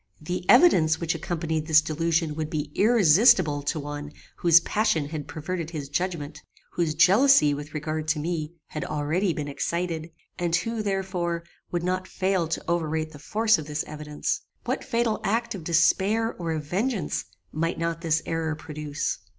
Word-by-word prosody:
The 180 +3 -5
evidence 165 - +6
which 170 -1 0
accompanied 160 -1 -3
this 155 -2 +7
delusion 160 +1 0
would 155 0 -4
be 150 -2 -3
irresistible 190 - +5
to 145 +2 -2
one 145 0 -6 0.3
whose 170 -1 +6
passion 170 -6 0
had 150 -2 -5
perverted 165 +2 -4
his 150 -5 -6
judgment, 165 -2 -3 0.3
whose 165 -3 -1
jealousy 195 - +5
with 145 +2 -7
regard 155 +1 -3
to 160 0 +1
me 160 0 -3
had 155 - -4
already 155 +6 0
been 150 -2 -4
excited, 165 +2 -3 0.3
and 175 -1 +1
who, 230 +4 -1
therefore, 190 -4 -2 0.3
would 175 -1 -2
not 185 +1 -1
fail 190 -3 0
to 165 - -3
overrate 160 -2 -1
the 145 - -12
force 220 +6 +2
of 150 - -7
this 150 0 -2
evidence. 150 -1 -4 0.2
What - - -2
fatal 235 -3 0
act 230 +4 0
of 190 -5 -7
despair 190 +7 +2
or 170 -2 -4
of 155 -1 -3
vengeance 190 - -2 0.3
might 165 +2 -1
not 165 0 -2
this 160 -2 +1
error 160 -1 -2
produce? 150 -1 -4
165 Hz, 165 wpm, -26 LUFS, 155-185 Hz, 0.3 s, this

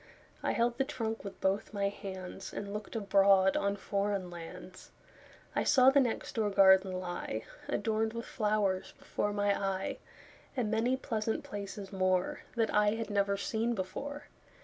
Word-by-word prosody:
I - - 0
held 235 +1 +1
the - - +4
trunk 225 -5 -3
with 200 - -8
both 195 +2 0
my 200 0 +1
handsAnd 195 +1 -6
looked 210 +1 -6
abroad 195 -2 +4
on 200 0 +1
foreign 200 -2 -1
lands.I 175 +2 -8
saw 260 -2 +6
the 280 - +5
next 245 -4 -1
door 220 -3 +1
garden 190 -1 +6
lie, 175 -11 -4 0.2
Adorned 220 +1 0
with 230 0 -5
flowers, 210 -3 0
before 205 - -2
my 205 -1 +2
eye, 195 -1 -2 0.6
And 225 -4 0
many 235 +4 +2
pleasant 225 -4 -2
places 200 -1 -6
moreThat 185 +4 0
I 210 0 +4
had 225 -2 -4
never 200 -1 +2
seen 225 +3 -1
before. 280 +10 -5
205 Hz, 145 wpm, -32 LUFS, 190-225 Hz, 0.6 s, saw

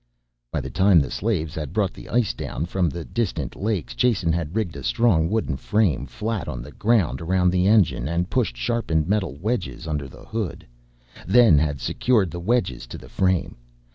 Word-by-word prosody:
By - - -1
the - - -7
time 95 0 +5
the 70 -4 -1
slaves 90 -8 -1
had 75 -2 -5
brought 100 -2 0
the - - -12
ice 120 -4 +1
down 80 - -4
from 90 -1 0
the 85 +1 -6
distant 115 -6 -2
lakes 95 - -2
Jason 95 - +2
had 80 +1 -2
rigged 105 -8 -1
a 70 - -6
strong 85 - +2
wooden 105 -10 -1
frame 80 - +1
flat 105 - -3
on - - -5
the 75 - -11
ground 100 - +1
around 90 +1 +2
the 90 +1 +2
engine 100 - +3
and 85 +2 -1
pushed - - -1
sharpened 80 - 0
metal 100 -6 0
wedges 100 -3 -3
under 75 -3 -2
the - - -14
hood, 110 -5 -4 0.6
then 105 -6 +6
had 75 -2 -1
secured 105 - +1
the 85 - -5
wedges 85 - 0
to - - -8
the - - -13
frame. 95 -7 0
90 Hz, 190 wpm, -23 LUFS, 75-105 Hz, 0.6 s, then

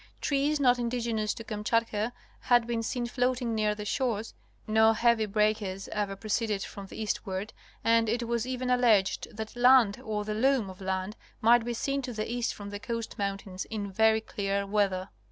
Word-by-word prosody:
Trees 290 +1 +1
not 250 -3 +4
indigenous 230 -3 -1
to 230 - -7
Kamchatka 220 +1 -1 0.3
had 240 -2 +3
been 235 -1 -1
seen 240 +2 -2
floating 245 -1 0
near 215 -1 +1
the 210 0 -6
shores, 225 -1 -1 0.3
no 220 0 +4
heavy 230 -1 +2
breakers 210 -2 0
ever 205 -2 -2
proceeded 215 0 -1
from 200 -1 -8
the - - -10
eastward 205 -1 -3 0.3
and 230 -1 +3
it 235 +2 0
was 235 0 -1
even 255 0 -2
alleged 230 -6 +3
that 220 +1 -6
land 245 -3 +5
or 210 -3 -3
the 215 - -2
loom 240 -3 +2
of 185 - -14
land 190 +2 -2 0.2
might 235 +1 +5
be 240 0 -3
seen 275 +4 -1
to 250 -2 -5
the 215 -1 -3
east 240 0 -1
from 205 -1 -8
the 205 - -5
coast 230 0 -5
mountains 195 -2 -3
in 205 -3 -5
very 220 +2 +3
clear 200 -2 -2
weather. 195 -2 0
220 Hz, 180 wpm, -29 LUFS, 205-240 Hz, 0.3 s, land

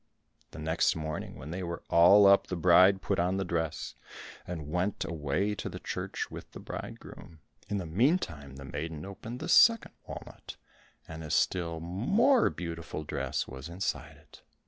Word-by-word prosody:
The - - -12
next 80 +2 +1
morning 80 -1 -5
when 75 +4 -8
they 95 +2 -4
were 85 -1 -5
all 95 +5 +7
up, 100 0 +6
the 95 - -3
bride 90 +3 +5
put - - 0
on 90 +2 +1
the 95 - -1
dress, 80 -3 -2 0.5
and 80 -4 -5
went 90 +4 -1
away 85 +6 -1
to 105 - -5
the - - -7
church - - -4
with - - -10
the - - -8
bridegroom. 85 - -9 0.3
In 105 - -1
the 95 - -3
meantime 85 - 0
the 70 0 -9
maiden 75 +3 -5
opened 110 +5 -8
the - - -5
second 230 -1 +6 0.2
walnut, - - -9 0.5
and 80 0 -8
a 75 - -7
still 85 0 0
more 195 - +3
beautiful 85 -2 -6
dress - - -3
was 65 +5 -8
inside 90 +3 -4
it. - - -18
85 Hz, 170 wpm, -30 LUFS, 80-100 Hz, 0.5 s, all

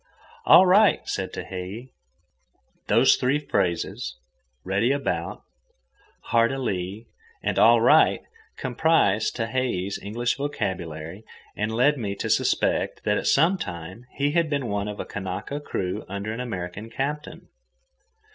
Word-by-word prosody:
"All 185 - +9
right," 200 +2 +4
said 95 -1 -3
Tehei. 95 +7 -7 1.0
Those - - +5
three 130 +3 +1
phrases, 85 - -2 0.5
"Ready 100 +7 +1
about," 140 0 -2 0.9
"Hard 115 0 +4
a 135 - -3
lee," 100 -3 -3 0.4
and - - 0
"All - - +7
right," - - +5 0.4
comprised 125 -6 +1
Tehei's 115 -5 -2
English 120 +4 -2
vocabulary 90 - -4 0.3
and 105 +1 -2
led 130 +5 +2
me 100 -3 -3
to - - -3
suspect - - +1
that - - +1
at - - -3
some 170 +7 +3
time 90 - -7
he 140 +1 +1
had 165 0 +1
been 140 -5 -1
one 100 0 -2
of 105 0 -6
a - - -4
Kanaka 95 +8 -5
crew 95 -10 -3
under 100 +3 -4
an 115 - -6
American 105 -3 -5
captain. 145 +6 -5
115 Hz, 130 wpm, -25 LUFS, 95-140 Hz, 1.0 s, All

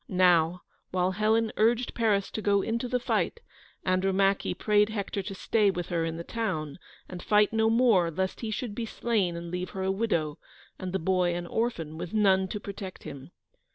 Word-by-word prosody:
Now, 180 -2 +3 0.3
while 185 0 +1
Helen 220 +3 +1
urged 235 +3 +2
Paris 210 -4 +1
to 220 - -4
go 200 -1 +2
into 230 +2 -2
the 250 +1 0
fight, 360 - -1 0.5
Andromache 195 +1 +1
prayed 210 0 +3
Hector 200 -2 -3
to 195 +1 -6
stay 210 +1 +2
with 175 -3 -3
her 170 -2 0
in 165 0 -3
the 170 - -5
town, 180 -9 -3 0.3
and 180 -1 -8
fight 210 0 +3
no 220 0 +3
more 225 -7 +4
lest 185 +3 -2
he 225 - -3
should 215 0 -3
be 230 +1 -4
slain 210 -7 0
and 170 0 -6
leave 180 0 -3
her 190 - -2
a 190 - +1
widow, 180 -8 -1 0.4
and 185 -1 -4
the 190 - 0
boy 180 0 +1
an 175 0 -4
orphan, 170 -7 -2
with 180 +5 -5
none 190 -3 +4
to 210 - -5
protect 195 -2 -8
him. 140 +1 -9
195 Hz, 190 wpm, -28 LUFS, 180-220 Hz, 0.5 s, more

